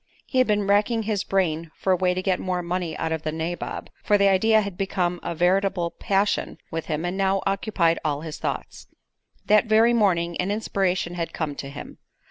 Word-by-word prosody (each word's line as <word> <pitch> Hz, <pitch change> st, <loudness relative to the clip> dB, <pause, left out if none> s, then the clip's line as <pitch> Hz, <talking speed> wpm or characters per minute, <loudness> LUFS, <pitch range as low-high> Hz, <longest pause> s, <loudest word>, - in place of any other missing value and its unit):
He 260 Hz, -, 0 dB
had 255 Hz, -, +4 dB
been 210 Hz, -1 st, +1 dB
racking 210 Hz, +3 st, +2 dB
his 210 Hz, -2 st, -1 dB
brain 165 Hz, -4 st, 0 dB
for 190 Hz, -, +1 dB
a -, -, +4 dB
way 180 Hz, 0 st, +1 dB
to 185 Hz, -, -2 dB
get 185 Hz, -2 st, +1 dB
more 180 Hz, -1 st, -2 dB
money 175 Hz, -2 st, -3 dB
out 160 Hz, -, -2 dB
of 160 Hz, -1 st, -1 dB
the 155 Hz, -, -2 dB
nabob, 165 Hz, +2 st, -4 dB
for 205 Hz, -, +4 dB
the 200 Hz, 0 st, +4 dB
idea 215 Hz, +3 st, +4 dB
had 200 Hz, -3 st, -5 dB
become 180 Hz, -2 st, -1 dB
a 170 Hz, -, -4 dB
veritable 180 Hz, 0 st, +1 dB
passion 200 Hz, +1 st, 0 dB
with 165 Hz, -1 st, -4 dB
him 155 Hz, +2 st, -2 dB
and 175 Hz, +1 st, -2 dB
now 195 Hz, 0 st, +1 dB
occupied 195 Hz, -4 st, +1 dB
all 150 Hz, -2 st, -1 dB
his 160 Hz, -1 st, -7 dB
thoughts. -, -, -5 dB, 0.6 s
That 215 Hz, +2 st, +4 dB
very 225 Hz, +2 st, +5 dB
morning 175 Hz, -7 st, +2 dB
an 180 Hz, -, -2 dB
inspiration 190 Hz, -4 st, -1 dB
had 170 Hz, -1 st, -4 dB
come 155 Hz, -3 st, -2 dB
to 140 Hz, -1 st, -7 dB
him. 140 Hz, -, -9 dB
185 Hz, 205 wpm, -24 LUFS, 170-200 Hz, 0.6 s, very